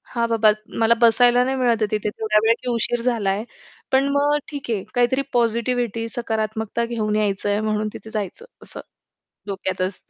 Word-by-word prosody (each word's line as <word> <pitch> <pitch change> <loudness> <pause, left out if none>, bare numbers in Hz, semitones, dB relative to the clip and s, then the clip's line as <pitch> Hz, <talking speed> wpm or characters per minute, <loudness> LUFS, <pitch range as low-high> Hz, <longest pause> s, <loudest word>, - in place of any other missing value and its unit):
हा 235 -1 +2
बाबा 225 -2 +4 0.3
मला 225 0 +5
बसायला 240 +1 +5
नाही 265 +1 -1
मिळत 235 -3 +2
आहे - - +4
तिथे 210 -1 -1
तेवढ्या 215 0 +1
वेळेला 225 +1 +5
की, 250 - -2
उशीर 235 +1 0
झालाय, 215 -4 0 0.5
पण 270 +1 +3
मग 290 +1 +3
ठीक 285 -4 -7
आहे 205 -4 -1
काहीतरी 245 +2 +2
पॉझिटिव्हिटी 235 -1 0
सकारात्मकता 220 -1 -2
घेऊन 220 -3 -1
यायचंय 205 -1 0
म्हणून 215 0 -1
तिथे 220 - -10
जायचं 215 - -5 0.2
असं - - -7 0.7
डोक्यात 190 -2 -3
असतं. 185 +1 -4
225 Hz, 165 wpm, -22 LUFS, 215-240 Hz, 0.7 s, मला